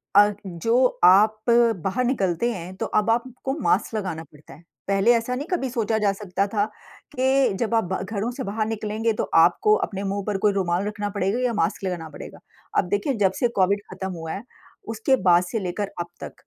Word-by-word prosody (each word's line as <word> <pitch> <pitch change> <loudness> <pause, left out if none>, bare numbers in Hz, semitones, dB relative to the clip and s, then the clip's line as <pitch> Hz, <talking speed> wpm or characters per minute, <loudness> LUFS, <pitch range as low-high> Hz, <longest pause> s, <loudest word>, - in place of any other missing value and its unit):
अ, 205 0 +6
जो 230 +9 +2 0.2
आप 205 +4 +6
बाहर 235 -1 +2
निकलते 235 -2 0
हैं 185 0 -7
तो - - -2
अब 215 +1 +1
आपको 255 +3 -1
मास्क 225 - +1
लगाना 185 -6 -3
पड़ता 150 0 -17
है। 170 - -16 0.2
पहले 195 +4 +3
ऐसा 235 +2 -1
नहीं 285 +5 -5
कभी 270 -7 -1
सोचा 225 -3 0
जा 205 -1 +2
सकता 195 -1 -2
था 205 0 0 0.5
कि 265 -2 +2
जब 235 -1 -1
आप 190 -5 0
घरों 215 +3 -3
से 260 +1 -5
बाहर 215 +1 -2
निकलेंगे 220 +1 -1
तो - - -2 0.2
आपको 425 - +3
अपने 195 -1 -6
मुँह 200 0 -2
पर 205 -2 0
कोई 205 +1 +2
रुमाल 185 0 0
रखना 210 -1 -3
पड़ेगा 200 +3 -1
या 250 -2 0
मास्क 180 -1 -1
लगाना 175 -4 -3
पड़ेगा। - - -10 0.4
अब - - +2
देखिए 205 +9 0
जब 190 - +4
से 245 - +3
कोविड 200 +2 +3
ख़त्म 190 0 -5
हुआ 165 -2 -6
है, 200 - -5 0.4
उसके 225 +4 +1
बाद 175 -1 +5
से 215 +5 -3
लेकर 195 +2 -3
अब 170 - -3 0.2
तक - - -7
205 Hz, 200 wpm, -24 LUFS, 190-230 Hz, 0.5 s, अ